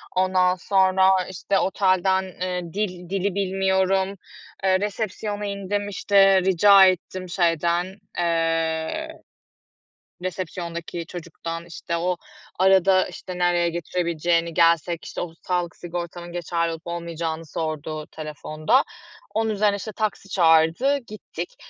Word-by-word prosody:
Ondan 185 0 +3
sonra, 190 0 +3 0.2
işte, 190 +1 -1
otelden, 190 0 +2
eee, 180 -1 -4
dil 180 -4 -3
dili 195 0 -1
bilmiyorum. 190 0 +1 0.5
Eee, 190 -1 +3
resepsiyona 205 0 -3
indim, 200 0 -2
işte, 195 -1 +4
rica 190 +1 +7
ettim 185 0 -1
şeyden, 175 +2 0 0.2
eee, 165 - 0 1.1
resepsiyondaki 170 -2 -5
çocuktan, 165 0 -7
işte, 170 0 -4
o 180 +1 -1 0.4
arada, 190 0 +5
işte, 180 -1 -8
nereye 175 -1 +2
götürebileceğini... 170 0 -1
Gelsek, 170 0 +2
işte, - - -5
o 170 -2 -5
sağlık 175 -1 -2
sigortamın 175 0 -6
geçerli 170 -1 -1
olup 165 +1 -8
olmayacağını 165 -1 -4
sordu 155 -1 -4
telefonda. 155 - 0 0.5
Onun 225 0 +1
üzerine, 210 -1 +2
işte, 210 +2 -6
taksi 210 -1 -3
çağırdı, 165 - +4
gittik 215 - -8
180 Hz, 110 wpm, -24 LUFS, 170-195 Hz, 1.1 s, rica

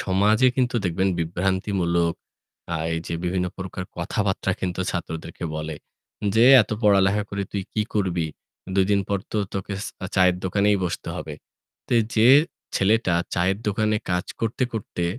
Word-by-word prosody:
সমাজে 105 +6 +3
কিন্তু 125 -2 +1
দেখবেন 95 +2 +1
বিভ্রান্তিমূলক, 85 0 0 0.6
আ - - +1 0.2
এই 80 - -2
যে - - -3
বিভিন্ন 90 +1 0
প্রকার 95 0 -5
কথাবার্তা 95 +3 -1
কিন্তু 90 0 -2
ছাত্রদেরকে 80 -1 -5
বলে, 75 0 -4 0.6
যে, 115 - +6 0.2
"এত - - -10
পড়ালেখা 100 0 +4
করে 100 0 -2
তুই 100 - -2
কি 110 - +1
করবি? 90 -6 0 0.5
২ 95 -1 +4
দিন 100 -1 +4
পর 100 - +1
তো 110 - 0 0.2
তোকে 100 +1 -3
স - - -4 0.3
চায়ের 90 -1 +5
দোকানেই 100 +2 +2
বসতে 85 - -4
হবে।" - - -6 0.5
তো - - -2 0.2
যে 110 +2 +5 0.5
ছেলেটা 100 -2 +2 0.2
চায়ের 95 +3 +1
দোকানে 110 +1 +1
কাজ 90 0 0 0.2
করতে, 115 +3 -1
করতে 100 -5 -3
95 Hz, 150 wpm, -24 LUFS, 90-105 Hz, 0.6 s, যে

